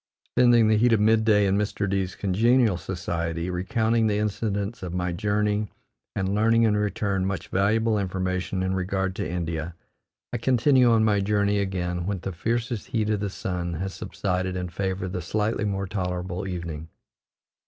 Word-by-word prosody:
Spending 120 -2 +5
the 110 0 +4
heat 120 +2 +4
of 110 - +4
mid 110 +1 +4
day 105 -2 +4
in 100 +1 +2
Mr. 105 -1 -1
D 95 0 +1
's 95 - -7
congenial 110 +3 +3
society, 85 -1 -3
recounting 110 +5 +1
the 105 -1 +1
incidents 105 0 -2
of 90 -1 -5
my 90 0 -1
journey 105 +2 0 0.4
and 95 0 -1
learning 115 +2 +3
in 110 -2 +3
return 100 -2 0
much 95 -3 -3
valuable 110 +3 +2
information 95 -1 -2
in 95 0 0
regard 95 0 -1
to - - -2
India, 85 -1 -3 0.6
I - - 0
continue 125 +1 +4
on 110 -1 +4
my 105 -2 +3
journey 100 0 +1
again 90 -2 -2
when 100 -1 -1
the 95 - -4
fiercest 115 +5 -2
heat 110 -2 0
of 105 - 0
the 100 0 -2
sun 90 -3 -3
has 95 +3 -4
subsided 95 -1 -2
in 90 -1 -3
favor 95 +1 -2
of 90 - -5
the 90 -1 -3
slightly 105 +4 -1
more 100 -1 -1
tolerable 90 -1 -3
evening. 85 -4 -5
100 Hz, 175 wpm, -25 LUFS, 90-110 Hz, 0.6 s, Spending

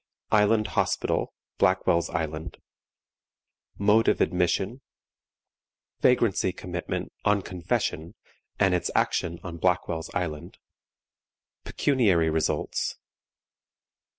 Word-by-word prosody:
ISLAND 105 +1 +3
HOSPITAL, - - 0 0.3
BLACKWELL'S 85 0 +2
ISLAND. 80 +1 -4 1.2
Mode 105 +3 +3
of - - +3
Admission. 95 +8 0 1.2
Vagrancy 115 -7 +3
Commitment 90 -1 -5
"on 100 -1 +2
Confession," 85 0 -2 0.4
and 95 -1 +4
its 90 - 0
Action 85 0 0
on 85 -2 -6
Blackwell's 85 -2 0
Island. 80 -6 -4 1.1
Pecuniary 100 - +2
Results. 80 0 -1
90 Hz, 80 wpm, -26 LUFS, 85-105 Hz, 1.2 s, and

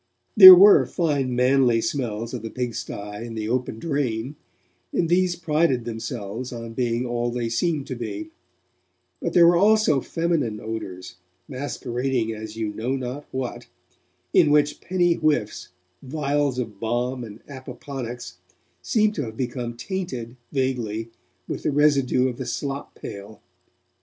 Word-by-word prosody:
There 185 -4 +13
were 200 +3 +7
fine 140 -7 -1
manly 125 -1 +3
smells 115 -3 -3
of 125 - -4
the 115 - -6
pigsty 125 -2 -4
and 105 +3 -7
the 110 -1 -3
open 125 -1 -2
drain, 135 -3 -2 0.6
and 170 - 0
these 180 0 +2
prided 155 -7 +1
themselves 115 0 -5
on 115 -1 -7
being 120 0 -1
all 120 0 -1
they 120 -1 -2
seemed 145 +4 -1
to 130 - -5
be; 320 - -6 0.9
but - - -2
there 175 -1 +7
were 175 +1 +6
also 205 -7 +4
feminine 160 -11 -1
odours, 90 -5 -7 0.3
masquerading 130 -3 -2
as 110 0 -8
you 110 -2 -3
knew 120 +6 -2
not 130 +3 -6
what, 130 -2 -5 0.7
in 155 - +5
which 150 0 +2
penny 175 -1 +2
whiffs, 150 -10 -1 0.3
vials 145 -1 -1
of 110 -5 -5
balm 120 +3 -2
and 110 -1 -11
opoponax, 125 -6 -8 0.4
seemed 215 -2 +2
to 145 -9 -3
have 110 -1 -9
become 120 -2 -4
tainted, 130 -10 -5 0.2
vaguely, 120 -5 -2 0.4
with - - -4
the - - 0
residue 140 -3 +3
of 125 -2 -4
the 130 - -5
slop 140 +3 -4
pail. 100 +1 -9
125 Hz, 140 wpm, -24 LUFS, 115-145 Hz, 0.9 s, There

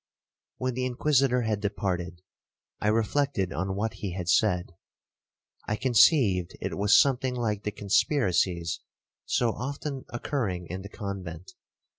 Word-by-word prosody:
'When 130 0 -1
the 130 +1 -1
Inquisitor 125 -1 +2
had 110 -2 0
departed, 90 -4 -3 0.6
I - - -1
reflected 110 - +1
on 95 +3 -2
what 110 +3 -1
he 95 -4 -3
had 90 -1 -4
said. 90 -2 +2 1.0
I 105 - 0
conceived 115 - +4
it - - -3
was 100 +1 +5
something 130 -2 +2
like 110 -4 -1
the 105 - 0
conspiracies 95 - +1 0.5
so 120 -2 +2
often 140 +3 -5
occurring 115 -8 -2
in 95 +1 -4
the 100 - -9
convent. 95 -5 -6
105 Hz, 130 wpm, -27 LUFS, 95-125 Hz, 1.0 s, was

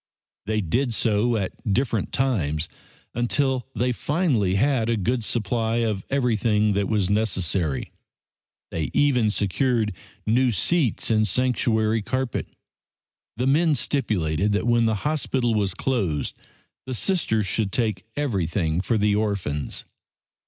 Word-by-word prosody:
They 110 0 +1
did 115 - 0
so 115 +2 +2
at 100 +1 -3
different 115 -1 0
times 80 - 0 0.5
until 130 +1 0
they 125 +1 +1
finally 125 - +1
had 120 0 +2
a 115 - +1
good 115 +4 0
supply 115 +1 -1
of 105 -3 -2
everything 110 -5 +2
that 100 0 0
was 105 -4 +1
necessary. 95 -8 0 0.8
They 80 -2 -2
even 125 -7 +3
secured 105 +2 0 0.3
new 125 +3 +3
seats 130 - +1
and 110 -1 +3
sanctuary 110 -1 +1
carpet. 130 +3 -2 0.9
The 125 - 0
men 155 +3 +3
stipulated 105 - 0
that 105 - 0
when 120 -1 +3
the 110 -1 +2
hospital 135 -5 0
was 100 -3 0
closed 95 - -1 0.5
the 130 - -3
Sisters 115 - 0
should 100 0 0
take 110 -6 -1
everything 90 - 0
for 115 +3 0
the 105 0 +2
orphans. 95 -10 -2
110 Hz, 125 wpm, -24 LUFS, 100-125 Hz, 0.9 s, even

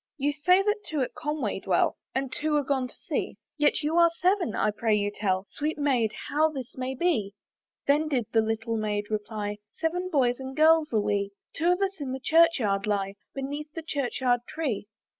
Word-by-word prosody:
"You 290 +1 +1
say 360 +6 +4
that 415 +1 0
two 305 -3 -2
at 255 - -2
Conway 305 -1 -2
dwell, - - +2 0.2
"And 265 0 -1
two 305 0 0
are 295 - +2
gone 265 -2 0
to - - -13
sea, - - -2 0.2
"Yet 295 0 +2
you 310 +3 +1
are 340 0 +7
seven; 365 - +2
I 215 - +2
pray 215 +1 +1
you 205 0 0
tell 190 -2 0
"Sweet 305 +2 -2
Maid, 260 -7 +2 0.2
how 310 +2 +3
this 265 -5 -7
may 260 +1 -3
be?" 235 - 0 0.5
Then 295 +3 +3
did 260 -6 0
the 225 - +4
little 225 +1 -1
Maid 210 -1 -2
reply, 210 -1 -3 0.2
"Seven 355 +3 -1
boys 255 -6 +2
and 265 +1 -7
girls 315 0 +5
are 220 - +3
we; 200 -1 0 0.2
"Two 330 - 0
of 360 - -3
us 390 -4 -2
in 260 -2 -3
the 265 - -4
church 330 +4 +5
yard 200 -4 0
lie, 195 -2 0 0.2
"Beneath 290 +3 -4
the 330 - -6
church 280 -5 -2
yard 245 -1 +3
tree." 265 -11 -2
270 Hz, 205 wpm, -27 LUFS, 220-310 Hz, 0.5 s, are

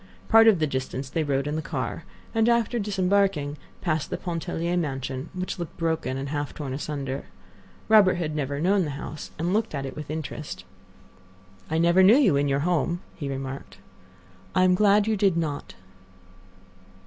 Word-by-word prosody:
Part 225 0 +7
of 215 -4 +6
the 155 - +1
distance 130 -1 -4
they 165 - 0
rode 140 -2 0
in 150 +1 -2
the 160 - -1
car, - - -4 0.3
and 225 0 +3
after 235 0 +2
disembarking, 195 -7 +1 0.3
passed 155 -4 -1
the - - -2
Pontellier 170 0 -2
mansion, 135 -3 -3
which 185 0 -4
looked 170 -3 -6
broken 160 -6 -1
and 135 +1 -4
half 145 0 -3
torn 140 -4 -5
asunder. 140 -1 -4 0.6
Robert 205 -4 +6
had 160 -3 -3
never 140 -1 -2
known 190 +4 +3
the 155 - -3
house, 150 +1 -7
and 170 +4 -1
looked 220 -5 0
at 135 -1 -3
it 135 - -6
with 150 -1 -7
interest. 155 -1 -5 1.0
"I 160 - 0
never 170 +3 +5
knew 200 +7 +7
you 230 - +4
in 140 +1 +2
your 140 0 +1
home," 175 +1 0
he 145 -5 -5
remarked. 135 0 -6 0.8
"I 185 - +5
am 185 0 +5
glad 205 +2 +4
you 220 0 +1
did 195 -4 +2
not." 150 -4 -3
160 Hz, 175 wpm, -26 LUFS, 140-190 Hz, 1.0 s, Part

